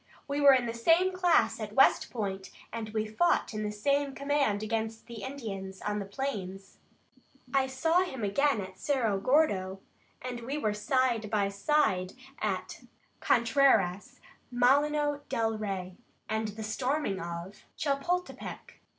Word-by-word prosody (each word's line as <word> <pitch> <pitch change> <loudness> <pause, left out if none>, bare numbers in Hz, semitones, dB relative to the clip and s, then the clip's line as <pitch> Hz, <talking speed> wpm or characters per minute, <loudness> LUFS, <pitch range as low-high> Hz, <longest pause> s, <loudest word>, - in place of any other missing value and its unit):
"We 285 0 -1
were 280 -1 +8
in 250 -2 +1
the 230 - -3
same 330 +11 +3
class 360 -1 +3
at - - -6
West - - +5
Point, 195 -4 -4 0.2
and 225 -1 -4
we 215 0 -1
fought 225 +6 +1
in 215 - -3
the 210 0 -2
same 280 +6 0
command 280 -7 0
against 225 0 -3
the 230 -2 -9
Indians 195 -8 -6
on 210 0 -2
the 200 - -4
plains. 195 -5 -5 0.7
I 270 -1 +3
saw 320 +7 +2
him 265 -11 -4
again 245 +4 +2
at 185 0 -9
Cerro 235 -9 0
Gordo, 195 -8 +2 0.4
and 250 -1 -5
we 265 +5 -4
were 215 -8 0
side 235 -1 0
by 205 -2 +1
side 200 -4 +1 0.3
at - - -3 0.4
Contreras, 235 -3 +2 0.3
Molino 290 +4 +2
del 225 -1 0
Rey, 185 -3 -4 0.3
and 220 0 -1
the 215 +1 -6
storming 250 -1 -1
of 170 +3 -7 0.2
Chapultepec. 330 +6 -3
230 Hz, 140 wpm, -30 LUFS, 205-280 Hz, 0.7 s, were